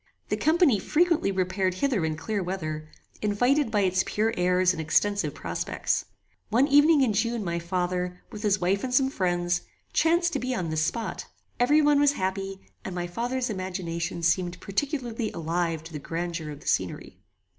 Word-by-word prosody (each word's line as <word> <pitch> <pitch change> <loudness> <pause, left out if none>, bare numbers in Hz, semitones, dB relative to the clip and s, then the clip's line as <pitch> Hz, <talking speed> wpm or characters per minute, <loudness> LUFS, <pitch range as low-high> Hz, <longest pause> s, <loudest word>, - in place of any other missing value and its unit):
The - - +1
company 315 - +3
frequently 330 - +2
repaired 185 0 0
hither 235 -3 +1
in 160 -1 -1
clear 205 +5 -2
weather, 155 -4 -4 0.3
invited 245 +7 +2
by 210 -2 +1
its 185 -1 +2
pure 220 +2 0
airs 180 +1 +3
and 160 - -4
extensive 200 +6 +1
prospects. - - -2 0.4
One 245 +6 +3
evening 290 +1 +6
in 245 -5 +3
June 230 +1 0
my 170 -2 -2
father, 180 +1 -2
with 210 - -7
his 205 -2 +2
wife 190 +3 +1
and 260 - -2
some 265 +1 +3
friends, 175 -4 0 0.3
chanced 340 +1 +3
to - - 0
be 255 0 -2
on 175 -6 -2
this 155 0 0
spot. 220 +8 -2 0.3
Every 295 +5 +4
one 295 -1 +4
was 290 0 +4
happy, 195 -3 -3 0.2
and 185 - -5
my 175 -1 -2
father's 240 +7 -2
imagination 180 -3 -4
seemed 175 +1 +1
particularly 240 - -2
alive 165 0 -1
to 165 0 -11
the 150 - -4
grandeur 165 +1 -4
of 145 -1 -8
the - - -13
scenery. 90 -2 -2
195 Hz, 175 wpm, -27 LUFS, 175-245 Hz, 0.4 s, evening